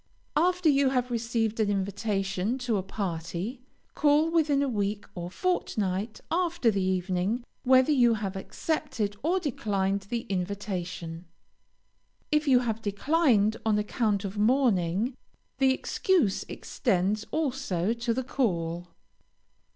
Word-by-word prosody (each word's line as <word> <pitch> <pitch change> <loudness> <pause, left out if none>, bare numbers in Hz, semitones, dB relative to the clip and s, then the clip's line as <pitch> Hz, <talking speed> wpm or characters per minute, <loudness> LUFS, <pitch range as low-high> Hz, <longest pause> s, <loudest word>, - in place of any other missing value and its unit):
After 360 +1 +2
you 280 -2 +4
have 250 -1 0
received 230 -1 -1
an 215 -2 +2
invitation 200 +2 -1
to 245 -4 -1
a - - 0
party, 190 +4 -4 0.3
call 300 +2 +3
within 295 -4 +3
a - - 0
week 205 -3 -1
or 175 -1 -5
fortnight 210 - -1
after 340 -7 +2
the 195 -2 -1
evening, 185 +4 0 0.2
whether 260 +3 +5
you 240 -5 +4
have 200 -3 -4
accepted 225 -1 -2
or 350 +6 +1
declined 200 - -1
the 235 -1 -1
invitation. 180 -4 -4 1.1
If 300 0 +2
you 255 -2 +5
have 225 -2 -2
declined 220 0 +2
on 220 -2 +2
account 210 -1 0
of 200 +1 -4
mourning, 220 -2 +2 0.4
the 265 -1 +5
excuse 320 - +1
extends 205 -1 -1
also 255 - 0
to 235 0 -2
the 260 +3 -1
call. 175 -10 -1
220 Hz, 125 wpm, -28 LUFS, 195-265 Hz, 1.1 s, whether